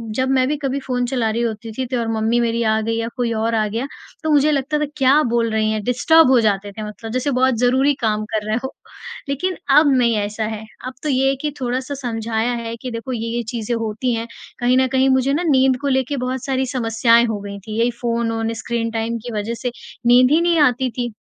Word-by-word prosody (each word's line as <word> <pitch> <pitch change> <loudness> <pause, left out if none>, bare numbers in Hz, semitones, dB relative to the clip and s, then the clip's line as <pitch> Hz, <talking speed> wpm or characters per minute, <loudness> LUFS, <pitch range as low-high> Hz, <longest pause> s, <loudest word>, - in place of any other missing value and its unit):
जब 260 +1 0
मैं 260 -1 +3
भी 300 - -1
कभी 275 -1 -2
फ़ोन 250 -2 -2
चला 245 -3 0
रही 225 +2 -1
होती 225 -1 -3
थी 260 - -1
तो 250 0 -2
और 230 - -2
मम्मी 225 +2 +1
मेरी 235 0 0
आ 220 0 +2
गई 225 +1 -1
या 230 - -2
कोई 245 -3 -1
और 225 +1 0
आ 215 -1 +2
गया 230 +6 -3 0.4
तो 315 - -1
मुझे 295 +1 +4
लगता 290 +1 0
था 300 - +1
क्या 275 +3 +5
बोल 235 -1 +1
रही 220 0 +1
हैं? 215 - -1
डिस्टर्ब 285 +6 +4
हो 255 - +6
जाते 205 -2 0
थे 215 +2 -7
मतलब 210 +2 -7
जैसे 255 +3 -1
बहुत 260 0 +2
ज़रूरी 260 +3 +3
काम 215 -2 0
कर 210 -1 -1
रहे 215 - 0
हो। 265 - -5 0.6
लेकिन 360 +7 -2 0.2
अब 300 -1 +6
नहीं 235 -2 +3
ऐसा 210 +1 -2
है। 220 0 -5 0.2
अब 260 - -6
तो 305 - -1
ये 270 0 +2
है 275 - +1
कि 300 - -2
थोड़ा-सा 255 +3 -2
समझाया 225 -1 -1
है 230 -1 -4
कि 255 - -5
देखो 230 +3 -5
ये-ये 230 0 -3
चीज़ें 235 0 -2
होती 230 +2 -2
हैं 230 0 -4 0.3
कहीं 245 +1 +3
न 260 0 +3
कहीं 265 0 +2
मुझे 260 +1 +2
ना 335 - 0
नींद 260 -1 +4
को 285 - -2
लेकर 265 +1 0
बहुत 255 0 -3
सारी 265 -1 0
समस्याएँ 230 0 +3
हो 220 -2 -2
गई 200 0 -7
थी। 215 +1 -3
यही 235 +1 +2
फ़ोन-वोन 230 -1 -1
स्क्रीन 230 -1 -2
टाइम 225 +1 -2
की 240 - -5
वज़ह 215 +3 -3
से 245 - -2 0.4
नींद 250 +2 +6
ही 320 +3 +4
नहीं 340 -1 +2
आती 255 -2 +3
थी। 240 -1 -3
240 Hz, 240 wpm, -20 LUFS, 225-265 Hz, 0.6 s, हो